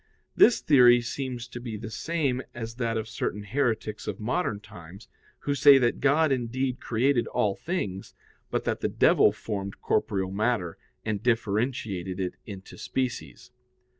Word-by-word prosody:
This 240 Hz, -, +6 dB
theory 125 Hz, -4 st, +6 dB
seems 120 Hz, 0 st, -5 dB
to 120 Hz, -, -7 dB
be 115 Hz, -3 st, -6 dB
the 110 Hz, +1 st, -7 dB
same 145 Hz, -4 st, -1 dB
as 115 Hz, -1 st, -6 dB
that 115 Hz, -2 st, -1 dB
of 110 Hz, -, -3 dB
certain 105 Hz, -, -3 dB
heretics 110 Hz, -2 st, -2 dB
of -, -, -4 dB
modern 115 Hz, -, -1 dB
times, 95 Hz, -3 st, -13 dB, 0.3 s
who 145 Hz, -, -1 dB
say 140 Hz, 0 st, +7 dB
that 120 Hz, -2 st, +1 dB
God 145 Hz, +2 st, +3 dB
indeed 130 Hz, +1 st, -1 dB
created 120 Hz, +2 st, +1 dB
all 105 Hz, -2 st, +1 dB
things, 100 Hz, -, -4 dB, 0.3 s
but -, -, -1 dB
that -, -, -1 dB
the -, -, 0 dB
devil -, -, +4 dB
formed 100 Hz, -2 st, -5 dB
corporeal 95 Hz, -1 st, 0 dB
matter, 105 Hz, -4 st, -1 dB, 0.3 s
and 105 Hz, -3 st, -2 dB
differentiated 105 Hz, -5 st, -1 dB
it 90 Hz, -1 st, -2 dB
into 95 Hz, -2 st, -10 dB
species. 130 Hz, -1 st, -4 dB
115 Hz, 150 wpm, -27 LUFS, 105-130 Hz, 0.3 s, say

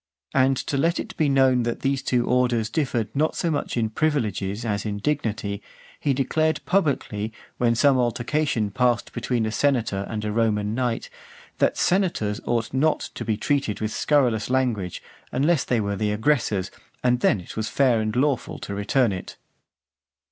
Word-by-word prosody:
And 135 Hz, 0 st, +3 dB
to 140 Hz, -, -2 dB
let 165 Hz, +5 st, +1 dB
it -, -, -6 dB
be 155 Hz, -2 st, +2 dB
known 135 Hz, -2 st, +4 dB
that 120 Hz, 0 st, -2 dB
those 135 Hz, -1 st, 0 dB
two 120 Hz, -2 st, +1 dB
orders 120 Hz, -3 st, +1 dB
differed 125 Hz, -7 st, -1 dB
not 155 Hz, +3 st, +1 dB
so 170 Hz, -, 0 dB
much 145 Hz, -4 st, -2 dB
in 110 Hz, -2 st, 0 dB
privileges 110 Hz, -, -1 dB
as 100 Hz, -3 st, -1 dB
in 105 Hz, -2 st, -3 dB
dignity, 110 Hz, -5 st, -2 dB, 0.4 s
he 145 Hz, -, +1 dB
declared 155 Hz, +4 st, +1 dB
publicly, 135 Hz, -, 0 dB, 0.3 s
when 115 Hz, -1 st, +3 dB
some 135 Hz, +2 st, +4 dB
altercation 120 Hz, -1 st, 0 dB
passed 120 Hz, +1 st, +1 dB
between 120 Hz, -1 st, -1 dB
a 110 Hz, -, -2 dB
senator 115 Hz, -6 st, 0 dB
and 110 Hz, -1 st, -3 dB
a 105 Hz, -, -1 dB
Roman 105 Hz, -2 st, +1 dB
knight, 125 Hz, -, -2 dB, 0.5 s
"that -, -, +2 dB
senators 175 Hz, -, +1 dB
ought 115 Hz, 0 st, -1 dB
not 150 Hz, +4 st, +1 dB
to -, -, -5 dB
be 110 Hz, -2 st, -1 dB
treated 140 Hz, -5 st, 0 dB
with 110 Hz, 0 st, -2 dB
scurrilous 125 Hz, -8 st, +2 dB
language, 120 Hz, -9 st, -1 dB, 0.3 s
unless 145 Hz, +3 st, +2 dB
they 120 Hz, -, +1 dB
were 100 Hz, -1 st, -1 dB
the 105 Hz, +1 st, 0 dB
aggressors, 105 Hz, -5 st, 0 dB, 0.3 s
and 125 Hz, -1 st, +3 dB
then 110 Hz, -, +3 dB
it 90 Hz, -, -10 dB
was 110 Hz, 0 st, -2 dB
fair 125 Hz, -5 st, +3 dB
and 110 Hz, +1 st, -2 dB
lawful 135 Hz, 0 st, 0 dB
to 100 Hz, -, -6 dB
return 110 Hz, +4 st, +2 dB
it." 95 Hz, -2 st, -6 dB
120 Hz, 170 wpm, -24 LUFS, 110-140 Hz, 0.5 s, known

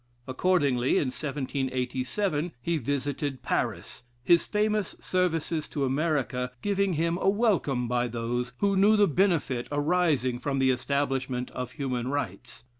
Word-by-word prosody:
Accordingly, 135 Hz, -3 st, +2 dB
in 135 Hz, -, +1 dB
1787. 135 Hz, +4 st, -2 dB
he 165 Hz, +6 st, -1 dB
visited 140 Hz, +1 st, -2 dB
Paris, -, -, -2 dB, 0.2 s
his 170 Hz, +6 st, +4 dB
famous 210 Hz, -2 st, 0 dB
services 165 Hz, -3 st, -1 dB
to 140 Hz, -2 st, -1 dB
America 135 Hz, -3 st, 0 dB
giving 200 Hz, -2 st, +1 dB
him 170 Hz, +2 st, 0 dB
a 195 Hz, -, +3 dB
welcome 195 Hz, -, +1 dB
by 120 Hz, 0 st, +1 dB
those 120 Hz, +1 st, -2 dB
who 200 Hz, -1 st, +3 dB
knew 205 Hz, +3 st, +5 dB
the 205 Hz, -1 st, +5 dB
benefit 155 Hz, -8 st, +1 dB
arising 145 Hz, -5 st, +1 dB
from 135 Hz, +2 st, -2 dB
the 135 Hz, -1 st, +4 dB
establishment 130 Hz, -1 st, -1 dB
of 125 Hz, -1 st, -5 dB
human 125 Hz, -4 st, -2 dB
rights. 130 Hz, -4 st, -4 dB
140 Hz, 130 wpm, -27 LUFS, 125-175 Hz, 0.2 s, knew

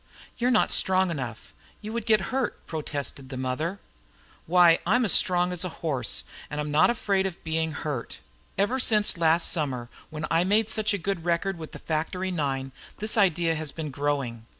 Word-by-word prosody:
"You're 245 Hz, +1 st, +2 dB
not 245 Hz, -4 st, +3 dB
strong 185 Hz, -1 st, +3 dB
enough; 130 Hz, -7 st, -6 dB, 0.3 s
you 215 Hz, +1 st, -7 dB
would 235 Hz, -2 st, -3 dB
get 215 Hz, 0 st, +2 dB
hurt," 265 Hz, -2 st, -2 dB
protested 145 Hz, -4 st, -5 dB
the 130 Hz, -, -6 dB
mother. 130 Hz, +9 st, -2 dB, 0.7 s
"Why, 175 Hz, -1 st, +6 dB
I'm 235 Hz, +7 st, +3 dB
as 200 Hz, -, +1 dB
strong 180 Hz, 0 st, +3 dB
as 180 Hz, -, -2 dB
a 185 Hz, -, -2 dB, 0.2 s
horse. 125 Hz, -, -1 dB, 0.3 s
I'm 150 Hz, 0 st, -3 dB
not 155 Hz, +7 st, +5 dB
afraid 200 Hz, -5 st, +1 dB
of 180 Hz, -, -9 dB
being 160 Hz, 0 st, -1 dB
hurt. 145 Hz, -8 st, -4 dB, 0.4 s
Ever 220 Hz, +7 st, +1 dB
since 215 Hz, -4 st, +3 dB
last 165 Hz, 0 st, +4 dB
summer 130 Hz, -7 st, -1 dB, 0.2 s
when 155 Hz, 0 st, -4 dB
I 165 Hz, +1 st, +4 dB
made 210 Hz, +3 st, +2 dB
such 215 Hz, -1 st, +1 dB
a 185 Hz, -, -7 dB
good 195 Hz, -4 st, -1 dB
record 175 Hz, +2 st, 0 dB
with 160 Hz, -, -8 dB
the -, -, -8 dB
factory 175 Hz, +4 st, -2 dB
nine 135 Hz, -5 st, -2 dB, 0.3 s
this 215 Hz, +1 st, -1 dB
idea 175 Hz, -5 st, +3 dB
has 155 Hz, -2 st, -4 dB
been 155 Hz, -2 st, -5 dB
growing. 135 Hz, -5 st, -2 dB
165 Hz, 180 wpm, -26 LUFS, 150-195 Hz, 0.7 s, Why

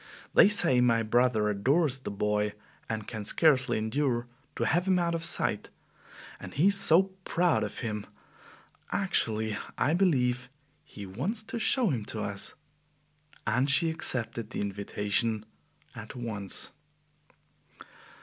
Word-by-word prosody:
They -, -, +7 dB
say 130 Hz, -12 st, +4 dB
my 115 Hz, -2 st, +3 dB
brother 115 Hz, -1 st, +2 dB
adores 135 Hz, +7 st, +1 dB
the -, -, -6 dB
boy 105 Hz, 0 st, 0 dB, 0.4 s
and 110 Hz, -1 st, -3 dB
can 110 Hz, -2 st, -5 dB
scarcely 135 Hz, +2 st, +3 dB
endure 120 Hz, +2 st, 0 dB, 0.3 s
to -, -, -1 dB
have 170 Hz, +9 st, +1 dB
him 185 Hz, -1 st, +4 dB
out 170 Hz, -1 st, 0 dB
of 165 Hz, -1 st, -2 dB
sight. 165 Hz, -, 0 dB, 0.7 s
And -, -, -9 dB
he 170 Hz, +8 st, +4 dB
is 200 Hz, -, +2 dB
so 190 Hz, 0 st, +4 dB
proud 170 Hz, -12 st, +1 dB
of 105 Hz, -, -5 dB
him! 105 Hz, -2 st, -4 dB, 0.8 s
Actually, 110 Hz, -, 0 dB, 0.2 s
I 150 Hz, -, +2 dB
believe 125 Hz, -9 st, +1 dB, 0.3 s
he 100 Hz, -, -10 dB
wants 165 Hz, -, -2 dB
to 230 Hz, -, -5 dB
show 230 Hz, -2 st, +2 dB
him 120 Hz, -6 st, -2 dB
to 110 Hz, 0 st, -4 dB
us." 100 Hz, 0 st, -5 dB, 0.9 s
And 125 Hz, +5 st, +1 dB
she 150 Hz, +4 st, +3 dB
accepted 115 Hz, -7 st, -2 dB
the -, -, -4 dB
invitation 105 Hz, +2 st, -1 dB, 0.5 s
at -, -, -9 dB
once. 110 Hz, -6 st, -3 dB
125 Hz, 135 wpm, -29 LUFS, 110-165 Hz, 0.9 s, They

